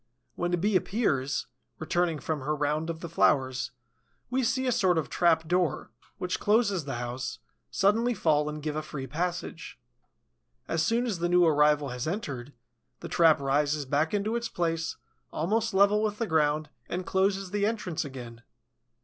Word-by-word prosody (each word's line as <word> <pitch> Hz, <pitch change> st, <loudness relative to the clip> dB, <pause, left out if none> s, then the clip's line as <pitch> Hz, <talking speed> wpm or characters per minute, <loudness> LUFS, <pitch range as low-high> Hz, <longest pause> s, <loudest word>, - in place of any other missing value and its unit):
When 175 Hz, 0 st, -2 dB
a 175 Hz, -, +2 dB
Bee 200 Hz, +4 st, +1 dB
appears, 145 Hz, -, 0 dB, 0.3 s
returning 165 Hz, +1 st, 0 dB
from 155 Hz, +1 st, -3 dB
her 150 Hz, +3 st, -1 dB
round 150 Hz, +2 st, -1 dB
of 165 Hz, -1 st, -5 dB
the 170 Hz, -, -5 dB
flowers, 130 Hz, -7 st, +2 dB, 0.6 s
we 260 Hz, +1 st, +1 dB
see 260 Hz, +3 st, +1 dB
a 250 Hz, -, +2 dB
sort 190 Hz, -7 st, +3 dB
of 160 Hz, -, -1 dB
trap 165 Hz, -2 st, +3 dB
door, 175 Hz, -8 st, 0 dB, 0.3 s
which 180 Hz, 0 st, -2 dB
closes 205 Hz, -, +2 dB
the 135 Hz, -3 st, -4 dB
house, 120 Hz, +2 st, -4 dB, 0.3 s
suddenly 225 Hz, +5 st, +2 dB
fall 150 Hz, -4 st, +2 dB
and 150 Hz, -1 st, -6 dB
give 150 Hz, -1 st, -2 dB
a 155 Hz, -, -1 dB
free 135 Hz, -3 st, -6 dB
passage. 170 Hz, +3 st, -4 dB, 0.9 s
As 165 Hz, 0 st, 0 dB
soon 230 Hz, +8 st, +1 dB
as 210 Hz, -8 st, -2 dB
the 175 Hz, +1 st, 0 dB
new 175 Hz, 0 st, +5 dB
arrival 150 Hz, -2 st, +3 dB
has 125 Hz, +3 st, -4 dB
entered, 145 Hz, -, -4 dB, 0.5 s
the -, -, -6 dB
trap 165 Hz, -3 st, +5 dB
rises 145 Hz, +1 st, +1 dB
back 145 Hz, +4 st, +1 dB
into 210 Hz, +2 st, 0 dB
its 235 Hz, -1 st, -2 dB
place, 165 Hz, -1 st, -2 dB, 0.3 s
almost 220 Hz, +8 st, 0 dB
level 200 Hz, +2 st, +4 dB
with 210 Hz, -1 st, -1 dB
the 230 Hz, -, -1 dB
ground, 155 Hz, -3 st, +1 dB, 0.2 s
and 180 Hz, +1 st, -3 dB
closes 190 Hz, 0 st, 0 dB
the 205 Hz, 0 st, +1 dB
entrance 210 Hz, -7 st, -2 dB
again. 125 Hz, -5 st, -9 dB
165 Hz, 170 wpm, -28 LUFS, 150-195 Hz, 0.9 s, new